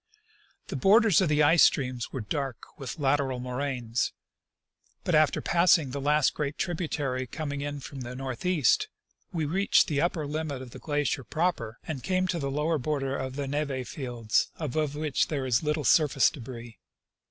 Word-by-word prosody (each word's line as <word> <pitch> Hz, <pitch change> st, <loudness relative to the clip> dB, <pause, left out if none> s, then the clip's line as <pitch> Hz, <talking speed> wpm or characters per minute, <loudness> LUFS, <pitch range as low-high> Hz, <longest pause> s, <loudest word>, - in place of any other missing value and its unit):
The -, -, -4 dB
borders 205 Hz, -1 st, +5 dB
of 180 Hz, -, +2 dB
the 150 Hz, 0 st, +3 dB
ice 165 Hz, +3 st, +5 dB
streams 125 Hz, -3 st, +2 dB
were 130 Hz, -, -4 dB
dark 135 Hz, +3 st, -3 dB, 0.2 s
with 135 Hz, +4 st, -6 dB
lateral 135 Hz, -3 st, +1 dB
moraines; 125 Hz, -2 st, -2 dB, 0.9 s
but 175 Hz, -, -1 dB
after 155 Hz, -1 st, +3 dB
passing 170 Hz, -5 st, +4 dB
the 140 Hz, +1 st, -4 dB
last 150 Hz, 0 st, +3 dB
great 145 Hz, -1 st, -3 dB
tributary 150 Hz, -7 st, -2 dB
com 150 Hz, +4 st, -4 dB
ing 140 Hz, 0 st, -4 dB
in 145 Hz, 0 st, -4 dB
from 135 Hz, 0 st, -8 dB
the 125 Hz, 0 st, -6 dB
northeast 135 Hz, +4 st, +1 dB, 0.4 s
we 160 Hz, -3 st, -1 dB
reached 190 Hz, +7 st, +3 dB
the 145 Hz, -3 st, 0 dB
upper 170 Hz, -3 st, 0 dB
limit 150 Hz, -2 st, -3 dB
of 130 Hz, -2 st, -9 dB
the -, -, -10 dB
glacier 145 Hz, -3 st, -1 dB
proper 125 Hz, -, -1 dB
and 150 Hz, -5 st, -5 dB
came 185 Hz, +3 st, 0 dB
to 170 Hz, -, 0 dB
the 140 Hz, -2 st, -2 dB
lower 150 Hz, +3 st, 0 dB
border 135 Hz, 0 st, -1 dB
of 130 Hz, -1 st, -4 dB
the 140 Hz, -1 st, -3 dB
neve 140 Hz, -3 st, -2 dB
fields, 120 Hz, -5 st, -1 dB
above 150 Hz, -1 st, -2 dB
which 150 Hz, -2 st, 0 dB
there 140 Hz, -4 st, -2 dB
is 120 Hz, -3 st, +2 dB
little 150 Hz, 0 st, -1 dB
surface 145 Hz, +2 st, +4 dB
debris. 120 Hz, -4 st, -9 dB
145 Hz, 175 wpm, -28 LUFS, 130-155 Hz, 0.9 s, borders